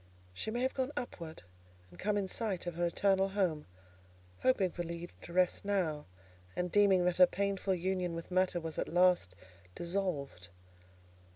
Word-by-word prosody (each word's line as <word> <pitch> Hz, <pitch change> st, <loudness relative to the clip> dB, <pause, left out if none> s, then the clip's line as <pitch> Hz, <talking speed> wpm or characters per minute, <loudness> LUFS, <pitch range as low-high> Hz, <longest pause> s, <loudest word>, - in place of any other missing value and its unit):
She 95 Hz, -, -4 dB
may 240 Hz, +3 st, -2 dB
have 260 Hz, -, +1 dB
gone 260 Hz, +1 st, -1 dB
upward, 170 Hz, -, -6 dB, 0.5 s
and 90 Hz, -, -16 dB
come 205 Hz, +1 st, 0 dB
in 200 Hz, -2 st, 0 dB
sight 195 Hz, -3 st, -2 dB
of 175 Hz, -, -3 dB
her 175 Hz, +1 st, 0 dB
eternal 195 Hz, +2 st, +2 dB
home, 185 Hz, -6 st, 0 dB, 0.7 s
hoping 195 Hz, -8 st, +2 dB
for 175 Hz, -, -4 dB
leave 170 Hz, 0 st, -6 dB
to -, -, -10 dB
rest 180 Hz, 0 st, +2 dB
now, 180 Hz, -7 st, -1 dB, 0.5 s
and 180 Hz, -1 st, -2 dB
deeming 195 Hz, -3 st, +5 dB
that 180 Hz, -1 st, +1 dB
her 180 Hz, -1 st, +8 dB
painful 200 Hz, -1 st, 0 dB
union 180 Hz, -1 st, -1 dB
with 165 Hz, +2 st, -7 dB
matter 185 Hz, -1 st, +2 dB
was 160 Hz, -1 st, -5 dB
at -, -, -2 dB
last 175 Hz, -, +3 dB, 0.4 s
dissolved. 170 Hz, -, -3 dB
180 Hz, 165 wpm, -33 LUFS, 170-195 Hz, 0.7 s, her